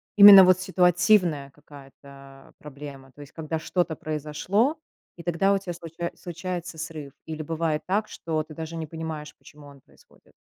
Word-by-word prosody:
именно 200 -2 +11
вот 185 0 +4
ситуативная 180 -5 +2
какая-то 140 -1 -16
проблема, 140 -2 -11
то 140 - -22
есть 145 - -13
когда 160 0 -4
что-то 175 -1 -1
произошло, 155 - -1 0.4
и 170 - -10
тогда 175 +3 +1
у - - +2
тебя 185 -3 -6
случае 170 0 -6
случается 175 0 -6
срыв? 155 -3 -7
Или 160 -1 -6
бывает 160 0 -2
так, 210 +3 0
что 160 -2 -3
ты 155 - -13
даже 160 +1 -7
не 160 -1 -5
понимаешь, 160 -1 -7
почему 145 -1 -16
он 140 -2 -16
происходит. - - -25
160 Hz, 160 wpm, -25 LUFS, 150-180 Hz, 0.4 s, именно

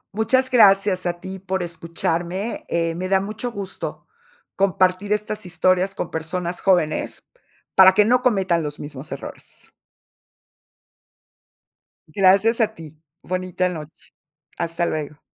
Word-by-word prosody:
Muchas 260 +4 +1
gracias 195 -5 +4
a 175 - 0
ti 190 +1 -7
por 190 -1 -3
escucharme, 170 +4 -3
eh, 165 -1 0
me 185 +2 -4
da 190 0 +4
mucho 215 +5 -5
gusto 200 -4 -5 0.5
compartir 190 +1 +1
estas 210 0 -2
historias 185 +2 +1
con - - -4
personas 170 +2 -4
jóvenes 175 -5 +1 0.5
para 190 0 +8
que 210 - +5
no 250 +3 +3
cometan 190 -9 +2
los 150 -1 -5
mismos 145 0 -8
errores. 140 - -10 2.4
Gracias 195 +7 +3
a 220 0 +1
ti. 155 -1 -13 0.2
Bonita 185 0 -1
noche. 155 -3 -7 0.7
Hasta 170 0 -1
luego. 150 -1 -4
185 Hz, 120 wpm, -22 LUFS, 170-200 Hz, 2.4 s, para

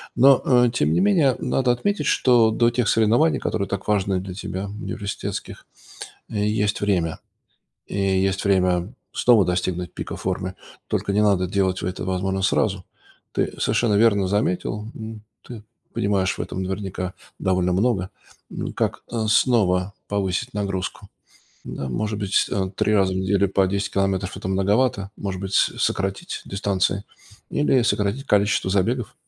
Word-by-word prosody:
Но, 135 +2 +6
э, 125 -2 +4
тем 120 - +1
не - - +2
менее, 175 -10 +3
надо 130 -2 +1
отметить, 200 +12 -1
что 120 -3 +4
до 120 +1 +3
тех 120 -1 0
соревнований, 115 +9 +3
которые 100 -3 -2
так 100 +1 -4
важны 100 -2 +1
для 95 0 -7
тебя, 95 +1 -5
университетских, 100 0 -5 0.6
есть 105 0 0
время 90 -6 0 0.7
и - - -5
есть 95 -1 +1
время 90 0 +2 0.2
снова 115 -5 +4
достигнуть 90 -1 -2
пика - - -5
формы. - - -3 0.3
Только 100 - -1
не 105 +1 +3
надо 100 -3 +3
делать 95 0 0
это, 90 +1 -3
возможно, 95 +1 -1
сразу. 95 -1 +1 0.5
Ты - - -1
совершенно 115 -3 +2
верно 100 -2 +4
заметил, 105 +2 -1
м, 110 -1 -8 0.2
ты 115 -4 -10 0.3
понимаешь 100 -2 0
в - - -10
этом, 95 - -3
наверняка, 95 -1 -4 0.2
довольно 90 -1 +1
много, 95 -2 +1 0.4
м, - - -5
как, - - -2
э, 110 -2 -1
снова 100 -5 +3 0.2
повысить 95 -1 -2
нагрузку? 95 -2 -3 0.6
Ну, 70 - -5
может 105 - -2
быть, 100 -2 -2
с - - +3
э, 95 -2 -1
3 105 - +1
раза 95 -2 +3
в - - -3
неделю 95 +1 +1
по 95 0 +3
10 100 +1 -2
километров- 95 -1 -1
это - - -6
многовато. 100 +2 +1
Может 95 -2 -4
быть, 95 0 -5
с - - +3
сократить 95 0 -2
дистанции 100 0 -1 0.5
или 140 -3 +2
сократить 115 +3 0
количество 105 -4 +2
забегов? 100 +6 0
100 Hz, 150 wpm, -23 LUFS, 95-110 Hz, 0.7 s, Но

